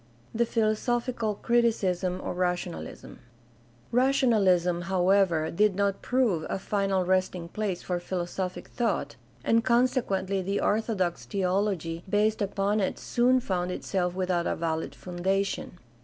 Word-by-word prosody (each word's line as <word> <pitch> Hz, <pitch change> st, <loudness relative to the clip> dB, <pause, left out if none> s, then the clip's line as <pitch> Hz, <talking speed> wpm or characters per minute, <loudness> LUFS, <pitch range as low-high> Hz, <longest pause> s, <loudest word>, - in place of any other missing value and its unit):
The 235 Hz, +1 st, +1 dB
philosophical 230 Hz, 0 st, 0 dB
criticism 195 Hz, -6 st, +1 dB
of -, -, -4 dB
rationalism. 180 Hz, -, -3 dB, 0.4 s
— 120 Hz, -, -31 dB, 0.3 s
Rationalism, 215 Hz, -9 st, +3 dB
however, 185 Hz, -3 st, +3 dB
did 210 Hz, +2 st, +2 dB
not 200 Hz, 0 st, 0 dB
prove 240 Hz, -11 st, +1 dB
a -, -, -1 dB
final 195 Hz, -1 st, 0 dB
resting 185 Hz, -2 st, 0 dB
place 200 Hz, -3 st, -3 dB
for 180 Hz, -1 st, -2 dB
philosophic 180 Hz, +1 st, -4 dB
thought, 230 Hz, -4 st, -1 dB, 0.3 s
and 230 Hz, 0 st, +3 dB
consequently 230 Hz, -6 st, +1 dB
the 195 Hz, +2 st, -1 dB
orthodox 205 Hz, -5 st, 0 dB
theology 185 Hz, -4 st, -1 dB
based 210 Hz, +2 st, +2 dB
upon 200 Hz, +1 st, 0 dB
it 190 Hz, -, -1 dB
soon 250 Hz, +1 st, +2 dB
found 180 Hz, -4 st, -1 dB
itself 180 Hz, -1 st, -2 dB
without 180 Hz, -2 st, 0 dB
a -, -, 0 dB
valid 160 Hz, -1 st, -2 dB
foundation. 190 Hz, +1 st, -2 dB
195 Hz, 125 wpm, -27 LUFS, 180-215 Hz, 0.4 s, Rationalism